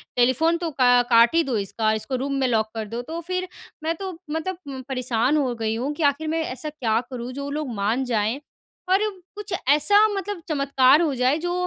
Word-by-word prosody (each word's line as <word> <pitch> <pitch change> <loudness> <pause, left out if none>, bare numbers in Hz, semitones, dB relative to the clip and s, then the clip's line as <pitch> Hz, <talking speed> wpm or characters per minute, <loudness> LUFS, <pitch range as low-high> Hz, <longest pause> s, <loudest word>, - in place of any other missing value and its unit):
"Telephone 260 +7 +3
तो 335 -1 -3
का 245 -3 +4
काट 235 +1 +6
ही 335 - +4
दो 260 -6 -1
इसका। 210 +2 -1
इसको 220 +5 -3
रूम 275 +2 -2
में 265 - +2
लॉक 220 -3 +1
कर 220 -1 -3
दो।" 230 +3 -4
तो 320 +7 -6
फ़िर 365 +2 -3 0.4
मैं 325 +1 0
तो 380 +2 -5 0.2
मतलब 320 +4 -3
उम, 265 -2 -6
परेशान 255 +1 +1
हो 265 -4 0
गई 225 -1 -2
हूँ 255 +5 -2
कि 310 - -4
आख़िर 310 +3 -7
मैं 325 +1 0
ऐसा 305 +1 -5
क्या 230 -7 0
करूँ 250 -1 -6
जो 280 +2 -5
वो 280 - -4
लोग 290 -4 -3
मान 215 +6 0
जाएँ। 225 +1 0 0.5
और 380 +1 +4 0.4
कुछ 415 -1 -7 0.2
ऐसा 355 +9 +5
मतलब 405 -2 -4
चमत्कार 275 -1 +4
हो 315 -4 +1
जाए 255 +3 +2
जो 350 +2 -2
270 Hz, 215 wpm, -23 LUFS, 240-320 Hz, 0.5 s, काट